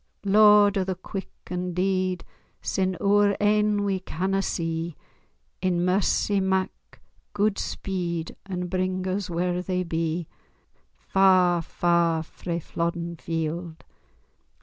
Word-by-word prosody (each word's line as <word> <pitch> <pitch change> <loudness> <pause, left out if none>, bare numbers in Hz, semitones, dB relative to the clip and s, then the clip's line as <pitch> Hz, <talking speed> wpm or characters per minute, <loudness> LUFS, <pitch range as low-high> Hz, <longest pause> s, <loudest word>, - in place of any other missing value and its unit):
Lord 205 0 +6
o' - - +1
the 190 0 -2
quick 190 +2 -7 0.2
an' 180 -1 -3
deed, 185 -1 0 0.3
Sin' 185 -1 -1
oor 205 0 +3
ain 210 0 +2
we 195 -2 0
canna 190 +2 -1
see, 165 -3 -2 0.7
In 180 -2 +1
mercy 195 +2 +2
mak 190 -1 +1 0.6
gude 205 0 +1
speed, 170 -4 -3
And 180 -2 -3
bring 185 0 -1
us 190 +1 -2
whar 175 +1 -1
they 180 0 -1
be, 165 0 -2 0.7
Far, 185 -3 +4
far, 170 -1 +1
frae 170 +1 -5
Flodden 170 +1 -3
Field! 165 +1 -4
185 Hz, 115 wpm, -25 LUFS, 170-195 Hz, 0.7 s, Lord